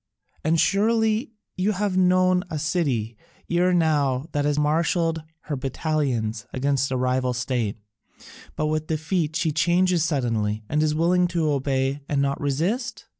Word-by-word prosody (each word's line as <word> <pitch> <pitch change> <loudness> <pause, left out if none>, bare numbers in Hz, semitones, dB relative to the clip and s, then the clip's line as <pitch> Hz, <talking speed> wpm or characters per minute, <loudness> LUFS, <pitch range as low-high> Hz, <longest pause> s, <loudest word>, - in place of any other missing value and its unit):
And 160 +2 +2
surely 220 - +2 0.2
you 200 +3 +1
have 200 -1 -1
known 185 0 +3
a 160 - -3
city 140 -8 -1 0.4
ere 175 +1 +3
now 145 -6 +1
that 145 0 0
has 145 0 +1
marshalled 165 +2 +1 0.2
her 150 - -4
battalions 130 -5 -2
against 135 0 0
a 130 - -1
rival 125 0 0
state, 120 -4 -2 0.8
but 155 - -1
with 155 0 -1
defeat 160 0 -1
she 165 -1 +1
changes 175 +2 +2
suddenly 115 -8 -1
and 150 - 0
is 155 -1 +1
willing 175 +3 +3
to 165 -3 0
obey 135 0 -1
and 145 - +1
not 140 0 0
resist?" 175 - -2
155 Hz, 145 wpm, -24 LUFS, 135-175 Hz, 0.8 s, known